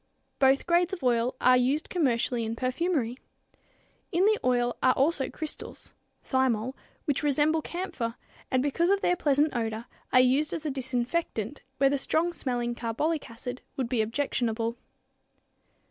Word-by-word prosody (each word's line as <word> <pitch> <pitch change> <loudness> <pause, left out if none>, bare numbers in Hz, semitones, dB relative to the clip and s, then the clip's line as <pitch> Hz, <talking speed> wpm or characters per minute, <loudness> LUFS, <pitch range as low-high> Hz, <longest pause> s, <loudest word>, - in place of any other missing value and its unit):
Both 270 0 +4
grades 350 +1 +2
of 365 - -5
oil 240 0 +2
are 255 0 +6
used 260 +5 +1
commercially 245 -7 +1
in 225 0 -3
perfumery. 255 -1 -1 0.9
In 360 +2 +3
the 430 0 +3
oil 245 -1 +2
are 255 - +4
also 275 0 +1
crystals 310 -1 -8 0.3
(thymol), 260 -2 +1 0.3
which 290 -4 0
resemble 300 +2 +2
camphor 325 -11 -4 0.3
and 255 0 +2
because 335 +5 +1
of 395 0 +3
their 355 - +3
pleasant 295 -2 +2
odor 225 -1 -2 0.3
are 255 - +6
used 265 +4 +3
as 320 - -4
a 300 - 0
disinfectant 260 -1 -2 0.2
where 275 0 +4
the 285 - +1
strong 340 +5 +1
smelling 245 -5 -2
carbolic 250 +7 -2
acid 245 +2 -7 0.2
would 255 -3 -1
be 245 -3 +1
objectionable. 230 -1 -1
260 Hz, 145 wpm, -28 LUFS, 240-310 Hz, 0.9 s, are